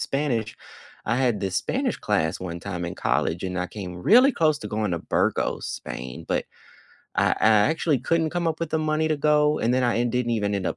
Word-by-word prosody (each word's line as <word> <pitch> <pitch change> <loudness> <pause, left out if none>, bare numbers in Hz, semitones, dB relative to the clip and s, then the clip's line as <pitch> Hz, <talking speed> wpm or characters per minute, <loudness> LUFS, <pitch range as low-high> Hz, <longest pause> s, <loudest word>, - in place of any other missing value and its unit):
Spanish 120 -6 -1 0.5
I 115 +2 +1
had 125 -5 +1
this 95 -2 -2
Spanish - - -1
class 80 0 0
one 85 -2 -5
time 90 -2 -5
in 85 - -5
college, 85 +2 0
and 90 0 -3
I 90 - -1
came 95 -3 -7
really 255 +5 +6
close 155 -7 +2
to - - -6
going 105 -3 -1
to 85 - -1
Burgos, - - -1
Spain. 65 0 -7
But - - -1 0.7
I - - +3
I - - +5 0.2
actually 160 -3 +1
couldn't 165 +4 +1
come 175 0 -2
up 160 0 -1
with 165 - -2
the 160 - 0
money 155 0 0
to 155 - +1
go, 150 +1 +3
and 120 +2 +1
then 130 - +2
I 120 -1 +2
and 120 0 0
didn't 125 -1 0
even 105 -2 0
end 95 -2 -2
up - - -2
120 Hz, 225 wpm, -24 LUFS, 95-155 Hz, 0.7 s, really